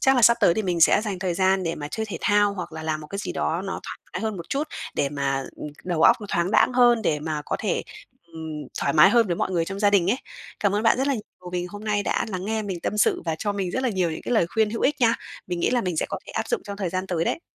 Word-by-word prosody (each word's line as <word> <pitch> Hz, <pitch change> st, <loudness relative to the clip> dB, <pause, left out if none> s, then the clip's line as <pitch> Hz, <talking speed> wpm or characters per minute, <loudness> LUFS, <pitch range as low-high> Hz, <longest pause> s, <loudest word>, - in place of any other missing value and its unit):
Chắc 270 Hz, 0 st, +4 dB
là 245 Hz, -, +3 dB
sắp 235 Hz, +1 st, +7 dB
tới 170 Hz, -, +5 dB
thì 220 Hz, -, 0 dB
mình 175 Hz, -3 st, -1 dB
sẽ 165 Hz, -, +6 dB
dành 205 Hz, -4 st, -3 dB
thời 180 Hz, -1 st, -1 dB
gian 190 Hz, +1 st, +2 dB
để 165 Hz, -1 st, -1 dB
mà 145 Hz, -1 st, -6 dB
chơi 220 Hz, +8 st, -3 dB
thể 200 Hz, -5 st, -5 dB
thao, 205 Hz, 0 st, +3 dB
hoặc 175 Hz, -3 st, -6 dB
là 160 Hz, 0 st, -6 dB
làm 155 Hz, -1 st, -2 dB
một 150 Hz, -, -9 dB
cái 200 Hz, -, -6 dB
gì 200 Hz, -, -3 dB
đó 165 Hz, +4 st, -1 dB
nó 195 Hz, -, -4 dB
thoải -, -, -7 dB
mái -, -, -3 dB
hơn 220 Hz, -3 st, -2 dB
một 170 Hz, -, -8 dB
chút 285 Hz, +3 st, -1 dB, 0.3 s
để 140 Hz, -, +1 dB
mà, 140 Hz, -1 st, -1 dB
ừm, -, -, -6 dB, 0.2 s
đầu 170 Hz, -3 st, 0 dB
óc 235 Hz, -, +7 dB
nó 205 Hz, -, -7 dB
thoáng 170 Hz, +2 st, +1 dB
đãng 255 Hz, -, +4 dB
hơn, 240 Hz, -2 st, +5 dB
để 150 Hz, -7 st, +1 dB
mà 155 Hz, -1 st, -3 dB
có -, -, -1 dB
thể, -, -, 0 dB, 0.5 s
ừm, 160 Hz, -3 st, -6 dB
thoải 140 Hz, -, +1 dB
mái 155 Hz, 0 st, +7 dB
hơn 235 Hz, -2 st, +4 dB
với 175 Hz, -3 st, -1 dB
mọi -, -, -1 dB
người 170 Hz, -3 st, +1 dB
trong 195 Hz, +3 st, -5 dB
gia 205 Hz, 0 st, +4 dB
đình 195 Hz, -2 st, +3 dB
ấy. 245 Hz, -, +1 dB, 0.4 s
Cảm 200 Hz, -1 st, +2 dB
ơn 210 Hz, -, +1 dB
bạn 225 Hz, -, +4 dB
rất 270 Hz, -, +1 dB
là 280 Hz, -, +2 dB
nhiều 195 Hz, -5 st, -9 dB
vì 175 Hz, -1 st, -1 dB
hôm 205 Hz, +3 st, -9 dB
nay 205 Hz, -1 st, +1 dB
đã -, -, 0 dB
lắng 185 Hz, -3 st, -4 dB
nghe 220 Hz, +1 st, -1 dB
mình 190 Hz, -4 st, -4 dB
tâm 210 Hz, -, -2 dB
sự -, -, +3 dB
và 165 Hz, -, -1 dB
cho 205 Hz, +3 st, -1 dB
mình 195 Hz, -3 st, -2 dB
rất 260 Hz, -, -2 dB
là 260 Hz, -, +2 dB
nhiều 185 Hz, -6 st, 0 dB
những 160 Hz, -, -6 dB
cái -, -, -3 dB
lời 220 Hz, -7 st, +3 dB
khuyên 220 Hz, +4 st, +1 dB
hữu 230 Hz, -, -4 dB
ích 295 Hz, +1 st, +1 dB
nha. 230 Hz, -1 st, +5 dB, 0.3 s
Mình 175 Hz, -1 st, -3 dB
nghĩ -, -, +2 dB
là 245 Hz, -1 st, +2 dB
mình 180 Hz, -6 st, -2 dB
sẽ -, -, 0 dB
có -, -, -3 dB
thể -, -, -8 dB
áp -, -, -2 dB
dụng 475 Hz, -5 st, -1 dB
trong 200 Hz, -1 st, -6 dB
thời 195 Hz, -3 st, -2 dB
gian 185 Hz, +2 st, -3 dB
tới 170 Hz, -3 st, -1 dB
đấy. -, -, -1 dB
190 Hz, 320 wpm, -24 LUFS, 170-215 Hz, 0.5 s, sắp